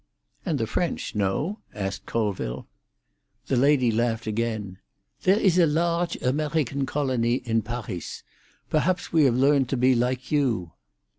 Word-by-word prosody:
"And 155 Hz, -, +1 dB
the 115 Hz, -, 0 dB
French, 170 Hz, +10 st, -2 dB
no?" 105 Hz, -, -1 dB, 0.2 s
asked 95 Hz, -2 st, -4 dB
Colville. 95 Hz, -, -2 dB, 0.8 s
The -, -, 0 dB
lady 130 Hz, -2 st, +4 dB
laughed 115 Hz, 0 st, 0 dB
again. 110 Hz, -3 st, -3 dB, 0.4 s
"There 190 Hz, +2 st, +4 dB
is 185 Hz, -4 st, +3 dB
a 170 Hz, -, +6 dB
large 170 Hz, +2 st, 0 dB
Amerhican 140 Hz, 0 st, 0 dB
colony 130 Hz, -5 st, 0 dB
in 115 Hz, -3 st, 0 dB
Parhis. 110 Hz, -6 st, -6 dB, 0.4 s
Perhaps 180 Hz, +4 st, 0 dB
we 160 Hz, -3 st, +5 dB
have 125 Hz, -3 st, +3 dB
learned 135 Hz, -1 st, +3 dB
to 135 Hz, -, 0 dB
be 130 Hz, +1 st, +4 dB
like 125 Hz, +1 st, -1 dB
you." 120 Hz, -, +1 dB
125 Hz, 140 wpm, -25 LUFS, 115-150 Hz, 0.8 s, a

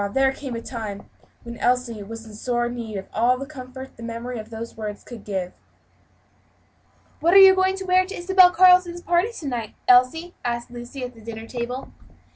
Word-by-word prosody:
there 270 Hz, 0 st, +4 dB
came 270 Hz, -3 st, -6 dB
a 230 Hz, -, -4 dB
time 215 Hz, -5 st, -6 dB, 0.4 s
when 235 Hz, 0 st, -8 dB
Elsie 245 Hz, -3 st, 0 dB
had 215 Hz, +3 st, -7 dB, 0.2 s
sore 240 Hz, +2 st, -1 dB
need 235 Hz, -3 st, -5 dB
of 190 Hz, -, -6 dB
all 240 Hz, +3 st, +3 dB
the 275 Hz, -, -6 dB
comfort 260 Hz, -2 st, -10 dB
the -, -, -12 dB
memory 235 Hz, +1 st, -5 dB
of 215 Hz, 0 st, -9 dB
those 230 Hz, 0 st, -7 dB
words 210 Hz, -2 st, -6 dB
could 235 Hz, -4 st, -11 dB
give. 190 Hz, -3 st, -4 dB, 1.7 s
"What 340 Hz, +4 st, +3 dB
are -, -, +10 dB
you 385 Hz, -1 st, +10 dB
going 375 Hz, 0 st, +2 dB
to 385 Hz, -, -6 dB
wear 370 Hz, 0 st, +4 dB
to 390 Hz, -, -7 dB
Isabel 370 Hz, +1 st, +6 dB
Carleton's 360 Hz, -1 st, +5 dB
party, 350 Hz, +5 st, +2 dB
to 310 Hz, -, -7 dB
night, 235 Hz, -5 st, -4 dB
Elsie?" 255 Hz, +8 st, +4 dB
asked 240 Hz, 0 st, -3 dB
Lucy, 245 Hz, +2 st, -8 dB
at 250 Hz, 0 st, -6 dB
the 225 Hz, -, -16 dB
dinner 225 Hz, 0 st, -8 dB
table. 245 Hz, +2 st, -5 dB
250 Hz, 190 wpm, -23 LUFS, 230-330 Hz, 1.7 s, are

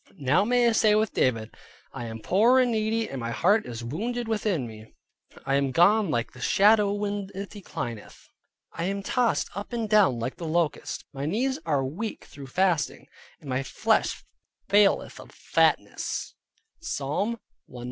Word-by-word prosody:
Now 140 Hz, +6 st, +2 dB
may 245 Hz, +2 st, +3 dB
I -, -, +4 dB
say 215 Hz, -1 st, +4 dB
with 215 Hz, 0 st, +1 dB
David 115 Hz, -3 st, 0 dB, 0.4 s
"I 120 Hz, -, -6 dB
am 110 Hz, -1 st, -7 dB
poor 225 Hz, -, +4 dB
and 250 Hz, -1 st, +3 dB
needy, 220 Hz, 0 st, 0 dB
and 135 Hz, -, -6 dB
my 115 Hz, -, -3 dB
heart 200 Hz, -, +2 dB
is 120 Hz, -1 st, -6 dB
wounded 225 Hz, -, -3 dB
within 210 Hz, -, -1 dB
me. 110 Hz, -1 st, -12 dB, 0.5 s
I 135 Hz, -, 0 dB
am 140 Hz, 0 st, +2 dB
gone 195 Hz, -, +4 dB
like 120 Hz, -6 st, -1 dB
the -, -, -13 dB
shadow 210 Hz, 0 st, +4 dB
when 205 Hz, -1 st, -3 dB
it 200 Hz, +1 st, -6 dB
declineth: 120 Hz, -, -7 dB, 0.4 s
I 170 Hz, -, -4 dB
am 200 Hz, +1 st, -2 dB
tossed 245 Hz, +2 st, 0 dB
up 200 Hz, +4 st, -6 dB
and 230 Hz, -2 st, -1 dB
down 205 Hz, -, +4 dB
like 115 Hz, +3 st, -4 dB
the 170 Hz, -, -5 dB
locust; 165 Hz, -1 st, -1 dB
my 140 Hz, +1 st, -4 dB
knees 260 Hz, -, 0 dB
are 140 Hz, -4 st, +1 dB
weak 195 Hz, +12 st, -5 dB
through 140 Hz, -1 st, -11 dB
fasting, 175 Hz, 0 st, 0 dB, 0.3 s
and 150 Hz, -, -14 dB
my 130 Hz, 0 st, -1 dB
flesh 135 Hz, -, 0 dB, 0.4 s
faileth 205 Hz, 0 st, +3 dB
of -, -, -12 dB
fatness" -, -, 0 dB, 0.5 s
(Psalm 200 Hz, -, -2 dB, 0.3 s
119. 125 Hz, -, -11 dB
195 Hz, 170 wpm, -26 LUFS, 135-215 Hz, 0.5 s, I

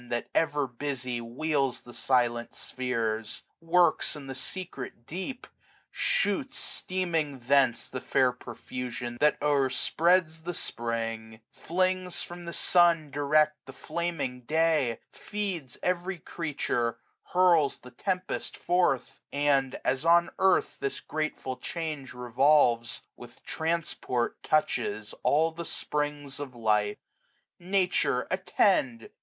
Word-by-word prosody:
That, 120 Hz, 0 st, -2 dB
ever 150 Hz, -3 st, +2 dB
busy, 125 Hz, -1 st, -4 dB
wheels 135 Hz, +2 st, -1 dB
the 120 Hz, -, -12 dB
silent 120 Hz, -2 st, +1 dB
spheres; 115 Hz, -4 st, -3 dB, 0.2 s
30 165 Hz, 0 st, -18 dB
Works 175 Hz, -2 st, +4 dB
in 145 Hz, -2 st, -8 dB
the 135 Hz, -, -5 dB
secret 135 Hz, -6 st, -6 dB
deep; 190 Hz, -, -5 dB, 0.5 s
shoots, 205 Hz, +7 st, 0 dB
steaming, 165 Hz, -6 st, -1 dB
thence 130 Hz, -1 st, +3 dB
The 130 Hz, -, -5 dB
fair 130 Hz, -1 st, +3 dB
profusion 120 Hz, 0 st, -6 dB
that 150 Hz, 0 st, +4 dB
overspreads 155 Hz, +4 st, +2 dB
the 175 Hz, +1 st, -4 dB
Spring: 115 Hz, -2 st, -3 dB
Flings 185 Hz, +1 st, -1 dB
from 175 Hz, 0 st, -9 dB
the 170 Hz, -, -5 dB
sun 170 Hz, -4 st, +4 dB
direct 150 Hz, +1 st, +2 dB
the 135 Hz, -, -9 dB
flaming 150 Hz, -5 st, -3 dB
day; 155 Hz, -6 st, +2 dB
Feeds 190 Hz, -11 st, -4 dB
every 180 Hz, +1 st, 0 dB
creature; 140 Hz, -8 st, -2 dB, 0.4 s
hurls 175 Hz, -6 st, +4 dB
the 125 Hz, -, -14 dB
tempest 185 Hz, +8 st, -3 dB
forth; 175 Hz, -8 st, +1 dB
And, 140 Hz, -2 st, +1 dB
as 135 Hz, -, +1 dB
on 170 Hz, +1 st, +5 dB
earth 190 Hz, -1 st, +3 dB
this 140 Hz, -, -2 dB
grateful 155 Hz, -4 st, -3 dB
change 155 Hz, -6 st, -5 dB
revolves, 125 Hz, -1 st, +3 dB
35 -, -, -47 dB
With -, -, -13 dB
transport 160 Hz, -7 st, -2 dB
touches 155 Hz, -, 0 dB
all 160 Hz, +3 st, +3 dB
the 170 Hz, +1 st, -6 dB
springs 145 Hz, -3 st, -3 dB
of 135 Hz, -3 st, -6 dB
life. 105 Hz, -2 st, +1 dB, 0.6 s
Nature, 175 Hz, -8 st, +1 dB
attend! 180 Hz, -, +1 dB
145 Hz, 115 wpm, -28 LUFS, 125-170 Hz, 0.6 s, on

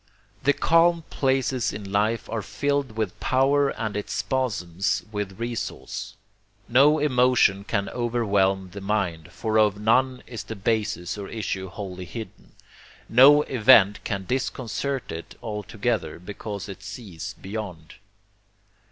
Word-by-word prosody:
The 145 Hz, +2 st, +3 dB
calm 165 Hz, +1 st, +3 dB
places 130 Hz, -2 st, +1 dB
in 100 Hz, -1 st, -7 dB
life 105 Hz, +3 st, +1 dB
are 115 Hz, -, -3 dB
filled 140 Hz, +5 st, -1 dB
with 110 Hz, -4 st, -3 dB
power 140 Hz, +2 st, +3 dB
and 110 Hz, -5 st, -4 dB
its 105 Hz, -, -3 dB
spasms 100 Hz, -9 st, -1 dB
with 105 Hz, -2 st, -4 dB
resource. 120 Hz, 0 st, -5 dB, 0.5 s
No 140 Hz, +6 st, +5 dB
emotion 125 Hz, -8 st, +3 dB
can 100 Hz, -1 st, -1 dB
overwhelm 100 Hz, -6 st, 0 dB
the 100 Hz, -, -8 dB
mind, 90 Hz, -5 st, -2 dB
for 110 Hz, +4 st, 0 dB
of 105 Hz, -1 st, +3 dB
none 125 Hz, +4 st, +2 dB
is 120 Hz, -3 st, -7 dB
the 110 Hz, -, -6 dB
basis 105 Hz, -3 st, -1 dB
or 100 Hz, -, -5 dB
issue 95 Hz, -4 st, -3 dB
wholly 95 Hz, -2 st, -7 dB
hidden; 110 Hz, +4 st, -9 dB, 0.6 s
no 140 Hz, +5 st, +7 dB
event 110 Hz, -6 st, +5 dB
can 100 Hz, -1 st, -3 dB
disconcert 130 Hz, +1 st, -2 dB
it 80 Hz, +1 st, -7 dB
altogether, 105 Hz, -3 st, -2 dB
because 100 Hz, +2 st, -7 dB
it 95 Hz, -1 st, -9 dB
sees 100 Hz, -1 st, -7 dB
beyond. 95 Hz, -6 st, -7 dB
110 Hz, 125 wpm, -25 LUFS, 100-125 Hz, 0.6 s, no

